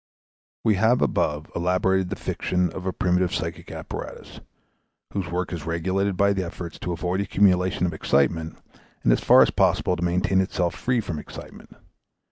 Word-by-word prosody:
We 105 Hz, -3 st, +3 dB
have 115 Hz, +3 st, +4 dB
above 75 Hz, +1 st, -1 dB
elaborated 90 Hz, +1 st, +1 dB
the -, -, -3 dB
fiction 90 Hz, -2 st, -1 dB
of 95 Hz, +1 st, -6 dB
a -, -, +1 dB
primitive 90 Hz, +1 st, +1 dB
psychic 85 Hz, -3 st, -5 dB
apparatus, -, -, -8 dB, 0.7 s
whose 95 Hz, -5 st, -3 dB
work 90 Hz, +2 st, -2 dB
is 85 Hz, -4 st, -5 dB
regulated 95 Hz, +4 st, -1 dB
by 100 Hz, +1 st, +3 dB
the 95 Hz, -1 st, -1 dB
efforts 85 Hz, 0 st, -7 dB
to 90 Hz, -, -4 dB
avoid 90 Hz, +3 st, -1 dB
accumulation 95 Hz, -2 st, +2 dB
of 85 Hz, -, -1 dB
excitement 80 Hz, +2 st, 0 dB, 0.5 s
and -, -, +5 dB
as -, -, +1 dB
far -, -, +7 dB
as -, -, +1 dB
possible 90 Hz, -, +2 dB
to 85 Hz, -, -4 dB
maintain 90 Hz, +2 st, +2 dB
itself 90 Hz, -2 st, -1 dB
free 125 Hz, -2 st, 0 dB
from 80 Hz, -7 st, -5 dB
excitement. -, -, -11 dB
90 Hz, 165 wpm, -24 LUFS, 85-95 Hz, 0.7 s, far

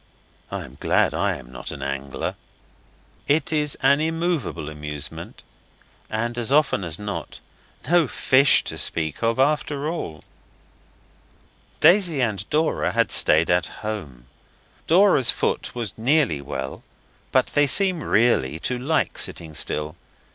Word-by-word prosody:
I -, -, -5 dB
am 65 Hz, 0 st, -15 dB
glad -, -, +2 dB
I -, -, 0 dB
am -, -, -14 dB
not -, -, -7 dB
an 70 Hz, -2 st, -7 dB
angler. 70 Hz, 0 st, -4 dB, 0.9 s
It 155 Hz, +2 st, +1 dB
is 150 Hz, -2 st, 0 dB
an 140 Hz, +2 st, +4 dB
immovable 160 Hz, -, -2 dB
amusement, 75 Hz, -1 st, -7 dB, 0.7 s
and, 115 Hz, +2 st, -3 dB
as 120 Hz, +2 st, -1 dB
often 140 Hz, -8 st, +2 dB
as 85 Hz, -2 st, -4 dB
not, 105 Hz, -1 st, -6 dB, 0.5 s
no 170 Hz, -1 st, +4 dB
fish 130 Hz, +2 st, +4 dB
to -, -, -3 dB
speak 80 Hz, -2 st, -1 dB
of 115 Hz, 0 st, +1 dB
after 145 Hz, +1 st, 0 dB
all. 80 Hz, -, -5 dB, 1.6 s
Daisy 175 Hz, -5 st, +5 dB
and 105 Hz, -6 st, -2 dB
Dora 155 Hz, +1 st, 0 dB
had -, -, +1 dB
stayed 80 Hz, +3 st, +4 dB
at 90 Hz, 0 st, +2 dB, 0.2 s
home: 75 Hz, -, -6 dB, 0.6 s
Dora's 175 Hz, -, +4 dB
foot -, -, 0 dB
was 115 Hz, -5 st, -4 dB
nearly 125 Hz, -, +2 dB
well 65 Hz, -1 st, -6 dB, 0.5 s
but -, -, +3 dB
they 145 Hz, 0 st, +3 dB
seem 185 Hz, +3 st, +2 dB
really 105 Hz, -, +2 dB
to 125 Hz, -1 st, -2 dB
like 140 Hz, -2 st, -1 dB
sitting 80 Hz, -2 st, -3 dB
still. 75 Hz, +1 st, -1 dB
115 Hz, 135 wpm, -23 LUFS, -, 1.6 s, Daisy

